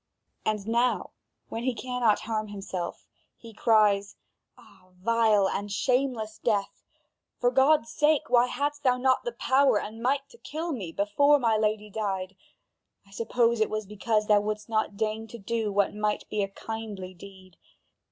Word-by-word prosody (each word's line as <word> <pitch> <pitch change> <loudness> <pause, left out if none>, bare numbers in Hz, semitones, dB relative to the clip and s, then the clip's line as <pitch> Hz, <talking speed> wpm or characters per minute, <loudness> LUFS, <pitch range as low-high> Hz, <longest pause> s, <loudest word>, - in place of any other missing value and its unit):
And 210 -1 -1
now 240 +2 +1 0.4
when 225 - -4
he 250 0 -1
cannot 245 -3 +1
harm 215 -1 -2
himself, 195 -4 -6 0.3
he 230 -1 -13
cries: 210 -2 +3 0.4
"Ah, 185 - -20
vile 215 0 +3
and 205 +1 -3
shameless 245 -1 0
death! 205 -4 -1 0.6
For 245 0 +2
God's 265 -1 +3
sake, 300 -1 +3
why 245 0 +4
hadst 290 +3 -2
thou 255 -3 +3
not 260 0 +2
the 240 - -1
power 260 -1 +3
and 220 +2 -7
might 275 +3 0
to 470 - -18
kill 325 +3 -4
me 200 - -4
before 245 - +3
my 230 -5 +2
lady 215 -1 0
died? 195 -3 -3 0.7
I 195 - -22
suppose 230 +2 +1
it 215 - +2
was 215 0 -3
because 210 +2 0
thou 210 -1 +4
wouldst 210 0 -4
not 215 -3 -1
deign 220 +1 -2
to 235 - -9
do 220 0 -2
what 200 0 +1
might 210 0 -2
be 210 - 0
a 195 - 0
kindly 205 -2 -7
deed. 185 -1 -14
220 Hz, 160 wpm, -27 LUFS, 205-245 Hz, 0.7 s, why